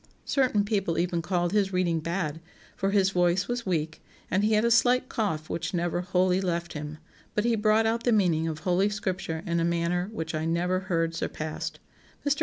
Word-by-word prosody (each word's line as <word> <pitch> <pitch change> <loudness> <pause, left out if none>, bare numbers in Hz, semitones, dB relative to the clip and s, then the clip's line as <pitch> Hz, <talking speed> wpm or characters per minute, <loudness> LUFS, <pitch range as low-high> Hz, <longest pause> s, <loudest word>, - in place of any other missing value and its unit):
Certain 250 -7 +2
people 195 -6 0
even 170 0 0
called 175 0 0
his 200 -2 +2
reading 180 -3 +1
bad, 165 -1 -3 0.3
for 195 - 0
his 195 -1 +3
voice 180 +1 +2
was 240 -3 -3
weak, 160 -3 -1 0.3
and 190 +3 +2
he 215 +1 +3
had 215 +2 +3
a 235 - +3
slight 250 +2 +4
cough 160 -9 -2
which 170 - -3
never 175 0 0
wholly 185 +1 +2
left 170 -2 -2
him; 150 0 -6 0.4
but 210 - +1
he 235 -1 +3
brought 215 +1 +3
out 230 +1 0
the 245 - +2
meaning 175 -7 +2
of 155 -1 -4
Holy 185 +4 +2
Scripture 185 -5 -3
in 170 -2 0
a - - +1
manner 170 +2 0
which 160 -7 -4
I 155 0 -1
never 175 +3 +1
heard 165 -3 -1
surpassed. 155 -1 -4 0.5
Mr. 290 +2 +2
180 Hz, 200 wpm, -27 LUFS, 165-205 Hz, 0.5 s, slight